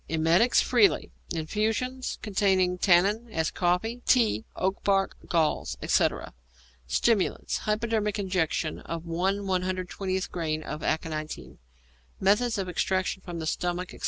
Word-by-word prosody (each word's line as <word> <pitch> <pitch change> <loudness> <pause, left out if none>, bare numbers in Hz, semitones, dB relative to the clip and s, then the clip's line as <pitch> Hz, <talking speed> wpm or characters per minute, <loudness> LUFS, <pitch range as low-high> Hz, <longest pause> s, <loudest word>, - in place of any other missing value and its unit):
_ - - -37
Emetics 170 +10 +4
freely; 235 -5 +3 0.2
infusions 220 +10 -2
containing 190 -3 +2
tannin, 200 +6 +3
as 160 -5 -1
coffee, 190 +7 0
tea, 220 - +3
oak 190 +1 -1
bark, 195 -1 +2
galls, 160 -3 0
etc. - - +1 0.5
Stimulants. 210 - +1
Hypodermic 215 -1 0
injection 180 -5 -1
of 165 0 -6
1/120 185 +1 -2
grain 155 -3 -2
of 150 0 -6
aconitine. 155 -1 -3 0.6
_Method 210 +4 +2
of 195 -2 -2
Extraction 190 +1 -1
from 175 -2 -6
the 160 - -4
Stomach, 175 +3 -2
etc. - - -12
185 Hz, 120 wpm, -27 LUFS, 170-210 Hz, 0.6 s, Emetics